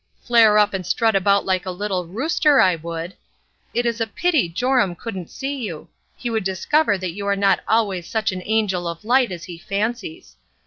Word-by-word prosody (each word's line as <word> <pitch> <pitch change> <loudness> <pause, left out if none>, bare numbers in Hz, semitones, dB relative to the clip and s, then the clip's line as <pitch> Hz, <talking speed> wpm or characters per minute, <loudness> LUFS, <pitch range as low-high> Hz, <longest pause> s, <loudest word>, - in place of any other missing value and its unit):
Flare 225 -3 +5
up 210 -1 +3
and 190 -1 -3
strut 220 +5 +1
about 200 +1 +3
like 185 -1 0
a 185 - -5
little 185 -1 -3
rooster, 290 - +2
I 185 - +5
would! 165 +2 -6 0.6
It 240 +1 -1
is 235 -1 -1
a 225 - +1
pity 300 - +1
Joram 245 0 +1
couldn't 190 -3 -7
see 275 +1 -4
you; 195 - -6 0.3
he 245 - -5
would 220 -2 -1
dis 190 0 -4
cover 300 -10 +3
that 185 -2 -4
you 200 +2 -5
are 200 - +2
not 195 -1 +3
always 200 -6 +1
such 220 -3 -1
an 185 -1 -5
angel 205 -5 0
of 170 +4 -6
light 245 -1 +3
as 175 -2 -6
he 175 -2 -9
fancies. 240 - -4
205 Hz, 205 wpm, -21 LUFS, 185-235 Hz, 0.6 s, Flare